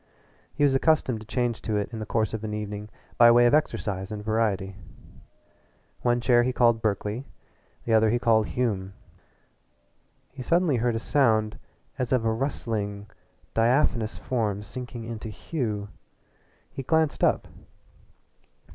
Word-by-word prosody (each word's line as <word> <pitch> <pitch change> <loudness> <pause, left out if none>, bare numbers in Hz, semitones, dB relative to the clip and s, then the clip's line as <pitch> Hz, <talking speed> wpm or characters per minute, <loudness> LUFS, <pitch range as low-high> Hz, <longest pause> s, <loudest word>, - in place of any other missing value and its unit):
He - - 0
was 140 -2 +4
accustomed 135 -4 +2
to 110 - -12
change 120 0 -1
to 110 - -2
it 105 +3 -3
in 110 - -4
the 110 - -5
course 110 -1 0
of 110 -1 -4
an 105 -1 -3
evening 105 0 -5 0.3
by 120 0 +9
way 120 +1 +6
of 120 - +4
exercise 105 -10 0
and 105 -1 -6
variety. 105 -4 0 1.3
One 120 0 +2
chair 120 0 +4
he 125 +1 +1
called 120 -2 +3
Berkeley, 110 +4 -2 0.6
the 115 - +1
other 110 0 +5
he 120 - +2
called 110 -3 +3
Hume. 100 -6 -2 1.4
He 130 - -9
suddenly 165 0 +2
heard 120 0 0
a - - +1
sound 110 -4 +1 0.4
as 125 -2 -2
of 125 -3 +2
a 110 - +2
rustling, 110 -5 -3 0.4
diaphanous 115 -1 +2
form 105 -5 -2
sinking 120 +2 -7
into 115 -1 -6
Hume. 105 -4 -4 0.8
He - - -6
glanced 160 +2 +1
up. - - +2
115 Hz, 145 wpm, -26 LUFS, 105-125 Hz, 1.4 s, by